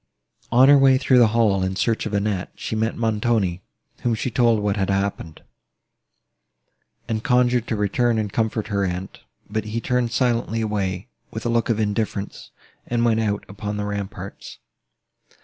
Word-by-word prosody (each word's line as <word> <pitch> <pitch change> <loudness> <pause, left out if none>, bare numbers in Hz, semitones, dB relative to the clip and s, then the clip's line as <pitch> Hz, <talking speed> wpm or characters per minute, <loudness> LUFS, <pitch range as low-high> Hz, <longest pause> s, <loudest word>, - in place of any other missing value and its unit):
On 130 +3 +6
her 145 0 +7
way 135 -1 +5
through 130 -1 +4
the 120 - +6
hall, 105 -3 +2
in 95 0 -1
search 110 +2 0
of 110 - -7
Annette, 100 -2 -1
she - - -4
met 110 +1 -1
Montoni, 110 -5 0 0.4
whom 120 -2 +1
she 120 +3 -3
told 115 -2 +3
what 105 -1 0
had 95 -2 -1
happened, 100 -5 -2 1.6
and 110 -1 -2
conjured 125 -2 +2
to 110 - -1
return 110 +3 +1
and 105 -2 -2
comfort 110 -1 -1
her 100 -1 0
aunt; 90 0 -4 0.3
but 110 +1 -3
he 110 +2 -3
turned 125 -1 0
silently 120 -2 0
away, 100 -1 -2 0.2
with 110 - -7
a - - +1
look 115 0 +1
of 115 -2 +1
indifference, 105 -1 -3 0.4
and 120 0 +1
went 115 -1 +2
out 105 -2 -1
upon 105 +1 -5
the 105 - -2
ramparts. 100 -1 -6
110 Hz, 165 wpm, -22 LUFS, 100-120 Hz, 1.6 s, her